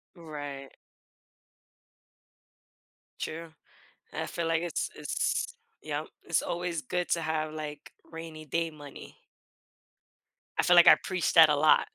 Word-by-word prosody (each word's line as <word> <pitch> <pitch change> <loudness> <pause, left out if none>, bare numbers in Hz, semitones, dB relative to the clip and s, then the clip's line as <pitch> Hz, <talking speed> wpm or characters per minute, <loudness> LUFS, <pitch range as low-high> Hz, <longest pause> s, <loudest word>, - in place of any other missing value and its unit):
Right. 145 -4 -8 2.5
True, 165 +1 -5 0.6
and - - -3
I - - -5
feel 170 -1 -3
like 165 0 +1
it's 175 - -2
it's 480 -1 -1 0.3
Yep, - - -3 0.2
it's - - +2
always 175 -2 -2
good 180 +2 -2
to 170 - +1
have, 155 -1 -2
like, 150 -1 -7 0.2
rainy-day 165 0 -4
money. 145 -2 -12 1.4
I - - +3
feel 180 - +5
like 175 - +8
I - - +11
preach 185 -2 -2
that 160 -2 +9
a 150 - +4
lot, 155 - +4
160 Hz, 125 wpm, -29 LUFS, 155-170 Hz, 2.5 s, I